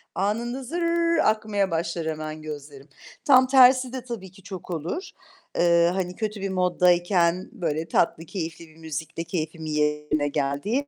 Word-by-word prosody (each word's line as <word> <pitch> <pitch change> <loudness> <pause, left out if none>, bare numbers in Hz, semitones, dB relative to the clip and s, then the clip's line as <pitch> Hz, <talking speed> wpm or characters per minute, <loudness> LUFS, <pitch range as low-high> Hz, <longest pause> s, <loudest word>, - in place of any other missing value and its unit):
Anında 235 +6 -1
zırrr 335 +3 +1
akmaya 215 -3 0
başlar 165 0 -2
hemen 155 0 -4
gözlerim. 145 -2 -9 0.4
Tam 260 -2 +6
tersi 255 -1 +6
de 260 -2 -5
tabii 225 -7 -7
ki 195 +1 -18
çok 185 -2 -8
olur. 170 - -4 0.5
Eee, 170 0 +4
hani 180 -1 -2
kötü 215 -1 -4
bir 195 - -2
moddayken 180 0 +2
böyle 160 -2 -2
tatlı, 165 0 +1
keyifli 165 -2 -6
bir 155 - -20
müzikle 160 +1 -5
keyfimin 160 -2 -4
yerine 150 0 0
geldiği. 145 - -1
175 Hz, 145 wpm, -25 LUFS, 155-215 Hz, 0.5 s, Tam